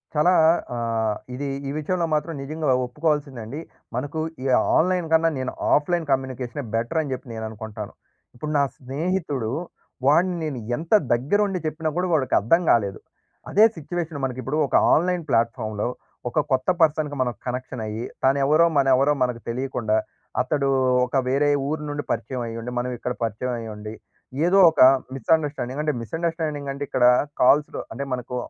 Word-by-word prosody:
చాలా 150 +4 +4 0.4
ఆహ్! 115 -2 -1 0.2
ఇది 140 +2 -4 0.2
ఈ - - -2
విషయంలో 170 +3 -1
మాత్రం 155 +2 0
నిజంగా 155 +3 -4
అలా 130 - +4
ఒప్పుకోవాల్సిందే 145 -1 -1
అండి. 135 +8 -6 0.4
మనకు 145 +5 -3 0.2
ఈ - - -5 0.3
ఆన్‌లైన్‌ 180 0 +2
కన్నా 165 0 +4
నేను 130 0 -2 0.2
ఆఫ్‌లైన్ 165 +3 +2
కమ్యూనికేషనే 130 0 -2
బెటర్ 120 +8 0
అని 145 -3 -5
చెప్పి 130 +1 -7
నేను 110 0 -5
అనుకుంటాను. 110 -1 -7 0.4
ఇప్పుడు 150 +5 -5
నా 140 - +4
స్నేహితుడు 140 -3 -2 0.6
వాడిని 175 +5 +4
నేను 140 -5 -3 0.2
ఎంత 165 +6 -3 0.2
దగ్గర 135 +12 +1
ఉండి 190 -2 -2
చెప్పినా 155 +1 -2
కూడా 180 +1 +1
వాడికి 135 -6 +2
అర్థం 140 - +3
కాలేదు. 100 -5 +1 0.5
అదే 210 - +5
సిట్యుయేషన్ 165 -1 -4
మనకి 130 -1 -4
ఇప్పుడు 135 +6 -2
ఒక - - -2 0.2
ఆన్‌లైన్ 180 +1 +2
ప్లాట్‌ఫార్మ్‌లో 110 -3 0 0.4
ఒక 135 - 0
కొత్త 130 +3 +1
పర్సన్‌కి 155 -2 +2
మనం 125 -1 0
కనెక్షన్ 125 -1 -4
అయ్యి 110 +3 -4 0.2
తాను 135 +1 +4
ఎవరో, 155 +4 +5
మన 135 -1 +3
ఎవరో, 140 +3 +3
మనకు 125 -2 -2
తెలియకుండా, 120 -3 -1 0.4
అతడూ 140 +2 0 0.4
ఒక 130 +2 -2
వేరే 140 +3 +2 0.2
ఊరు 155 0 -2
నుండి 145 0 -3
పరిచయమయ్యుండి 115 0 -4
మనం 125 +1 -2
ఇక్కడ 125 +1 -3
పరిచయమయ్యుండి 110 -1 -4 0.5
ఏదో 180 +3 +4
ఒక - - +1 0.3
మిస్‌అండర్‌స్టాండింగ్ 145 -1 0
అంటే 150 -1 0
మిస్‌అండర్‌స్టాండింగ్ 160 +1 -3
అంటే 140 +1 -5
ఇక్కడ 125 -2 +2 0.4
కాల్స్‌లో 145 +4 +3
అంటే 140 - -4
మనకు 125 0 -4
135 Hz, 155 wpm, -24 LUFS, 120-155 Hz, 0.6 s, అదే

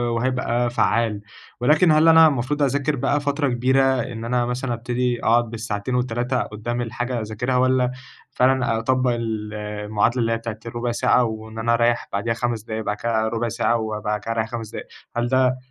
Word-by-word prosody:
وهيبقى 120 0 0
فعّال. 115 -3 +1 0.4
ولكن 155 +6 +4
هل 155 +1 +5
أنا 160 0 +8
المفروض 145 +1 -1
أذاكر 140 +2 +1
بقى 140 +2 +1
فترة 145 0 0
كبيرة، 130 +2 +2 0.2
إن 115 -2 -6
أنا 120 0 +1
مثلًا 125 0 -2
أبتدي 120 +1 -2
أقعد 120 0 +3
بالساعتين 110 +1 -3
وال3 125 +1 0
قدّام 120 +3 -4
الحاجة 120 +1 -3
أذاكرها، 110 +4 -2
والّا 130 0 +2 0.4
فعلًا 125 -3 +2
أطبّق 130 +2 +1
ال 110 -2 -3
المعادلة 105 +3 -1
اللي 115 0 +1
هي 115 - +1
بتاعة 115 -1 -6
الرُبع 120 +1 -3
ساعة، 125 +1 +3
وإن 110 0 -5
أنا 115 +1 +1
أريّح 120 0 +1
بعديها 115 +4 0
5 115 -1 -2
دقايق، 110 0 -4
بعد 105 - -1
كده 110 0 0
رُبع 115 +1 -1
ساعة، 115 +1 +1
وبعد 105 -1 -2
كده 110 +3 -5
أريّح 110 -1 -1
5 115 -3 -5
دقايق، - - -7 0.3
هل 120 0 0
ده 130 0 +2
120 Hz, 180 wpm, -22 LUFS, 110-125 Hz, 0.4 s, أنا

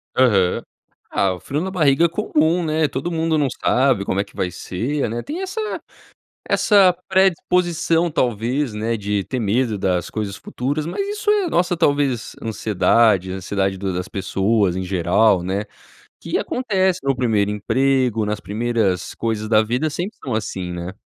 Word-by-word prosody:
Aham. 100 -8 +3 0.5
Ah, 95 -1 +1
o 90 - -8
frio 140 - -3
na 190 +2 -3
barriga 155 -3 +3
é - - +2
comum, 170 -2 +1
né. 155 0 +1
Todo 140 +6 -4
mundo 160 -1 0
não 145 -2 +2
sabe 125 -4 +1
como 95 - -1
é - - +2
que - - -21
vai 90 - -2
ser, 115 - -3
né. 120 +2 -3
Tem 325 +6 -5
essa 385 +3 -4 0.9
essa 195 -4 +5
predisposição, 175 -2 +2
talvez, 125 +1 0
né, 110 +2 -1
de 105 -1 -1
ter 130 - -3
medo 110 +1 0
das 90 -3 -1
coisas 105 -2 -4
futuras 145 +8 -3
mas 390 - -3
isso 415 +1 -2
é 415 -3 +3
nossa, 175 - +1
talvez, 140 -6 0
ansiedade 105 -2 +2
ansiedade 95 +1 -2
do 95 0 -3
das 90 +1 -3
pessoas 100 0 0
em 95 - -2
geral, 90 +2 +2
né, 95 +3 -2 0.5
que - - -2
acontece 190 -7 0
no 135 0 +2
1º 110 -5 +1
emprego; 125 +1 +1
nas 105 0 -2
primeiras 110 -3 -1
coisas 110 -2 -2
da 110 -1 +5
vida 125 +8 -1
sempre 180 +8 -5
são 130 - -3
assim, 95 -4 -3
né. 90 +2 -6
120 Hz, 165 wpm, -21 LUFS, 100-160 Hz, 0.9 s, essa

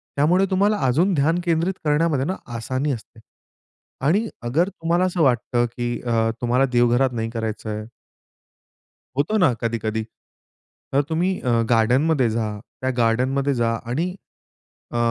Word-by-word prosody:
त्यामुळे 175 +7 +3
तुम्हाला 200 +3 +3
अजून 170 +10 +2
ध्यान 165 +3 +2
केंद्रित 170 +3 +1
करण्यामध्ये 150 -2 +2
ना 185 +5 -1 0.2
आसानी 130 +5 -2
असते. 115 -2 -7 0.9
आणि 200 +10 +2 0.2
अगर 155 +11 +1
तुम्हाला 170 0 0
असं 180 -2 -1
वाटतं 120 -2 +2
की 120 -1 -2
अ, 115 -2 +1
तुम्हाला 125 +2 +2
देवघरात 120 +2 +3
नाही 115 -1 -2
करायचंय 110 -1 -4 1.3
होतो 160 +10 +1
ना 165 -10 +4
कधी-कधी. 110 -1 -1 0.9
तर 140 - +4
तुम्ही 180 +4 0
अ, 125 - -2 0.2
गार्डनमध्ये 125 +4 +3
जा. 110 -2 -2 0.2
त्या 130 - 0
गार्डनमध्ये 130 +4 +1
जा 115 -2 +1 0.2
आणि 160 +9 0 0.8
अ, 120 - -2
130 Hz, 130 wpm, -22 LUFS, 115-165 Hz, 1.3 s, ना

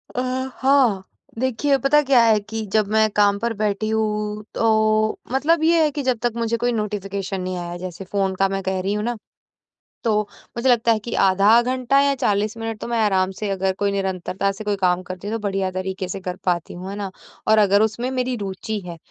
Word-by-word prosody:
अ, 250 - 0 0.4
हाँ। 260 -8 +3 0.4
देखिए, 260 +3 +1
पता 275 +3 +3
क्या 265 -3 +5
है 220 -2 +4
कि 220 +1 -5
जब 215 -2 +3
मैं 220 0 +4
काम 205 -1 +4
पर 235 +2 -1
बैठी 210 +1 0
हूँ 210 -1 -1
तो 215 -1 +2
मतलब 310 +5 +2
ये 330 0 +4
है 305 - +2
कि 285 0 -4
जब 255 -2 +1
तक 240 -2 +1
मुझे 230 0 -1
कोई 240 +1 0
नोटिफ़िकेशन 200 -3 -3
नहीं 185 0 -3
आया 175 0 -5
जैसे 185 +1 -7
फ़ोन 195 -2 0
का 195 +1 +2
मैं 195 0 -2
कह 190 0 -1
रही 195 +2 -1
हूँ 210 0 -2
ना। 240 +1 -2 0.9
तो 215 -2 +3 0.4
मुझे 245 +3 +1
लगता 235 -1 +4
है 220 - +2
कि 235 - -4
आधा 200 +5 +5
घंटा 255 +2 +1
या 280 0 +3
40 210 -3 0
मिनट 225 -1 -4
तो - - -4
मैं 235 0 -1
आराम 190 -2 +2
से 210 - -2
अगर 190 -1 0
कोई 200 0 +1
निरंतरता 195 0 -1
से 195 +2 -8
कोई 210 -1 0
काम 180 -1 +2
करती 185 +2 -7
तो 225 - -2
बढ़िया 195 -1 -1
तरीके 185 0 -4
से 195 - -4
कर 180 -1 -4
पाती 175 -2 -1
हूँ। 185 +2 -7
है 200 - -5
ना? 200 -1 -4 0.4
और 220 - +5
अगर 200 -1 +4
उसमें 220 +3 0
मेरी 255 -1 -1
रुचि 200 +2 -4
है 170 -1 -7
210 Hz, 215 wpm, -22 LUFS, 195-235 Hz, 0.9 s, क्या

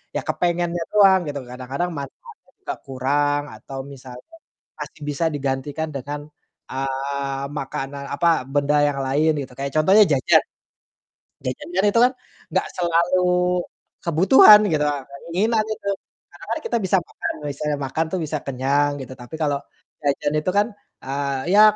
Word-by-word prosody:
ya - - +1
kepengennya 175 -1 0
doang 195 -2 +6
gitu, 145 -1 -3
kadang-kadang 130 +7 -4
manfaatnya 415 - -10 0.2
gak 360 - -3
kurang 145 +2 0
atau 135 -1 -8
misalnya 130 - -12 0.4
masih - - -8
bisa 145 +3 -1
digantikan 140 +3 -2
dengan, 145 +2 -4 0.5
eee, 135 +1 -3 0.2
makanan 135 +1 -5
apa, 170 +3 +1 0.3
benda 145 +1 +2
yang 140 -1 -1
lain 150 +4 +2
gitu, 130 -2 -8
kayak 140 0 -3
contohnya 190 +8 +6
jajan. 130 - +4 1.0
Jajan 125 0 -4
kan 190 - +2
itu 230 +3 +2
kan 250 - +3 0.4
gak - - +2
selalu 170 +1 +2 0.8
kebutuhan 190 - +8
gitu, 150 -2 +2
eee, 140 -2 -4 0.2
keinginan 215 +6 +1
itu. 200 - -10 0.4
Karena - - -13
kan - - -3
kita 455 - 0
bisa 190 - +2
makan, - - -4 0.2
misalnya 145 +1 -2
makan 160 +5 -1
tuh - - -1
bisa 155 0 -2
kenyang 140 +2 +1
gitu, 130 0 -8
tapi 125 +6 -8
kalau 145 -2 +1 0.5
jajan 145 +1 +1
itu 155 - -2
kan, 205 +1 +4 0.4
eee, 140 0 -2
ya 210 - +8
145 Hz, 145 wpm, -22 LUFS, 135-175 Hz, 1.0 s, kebutuhan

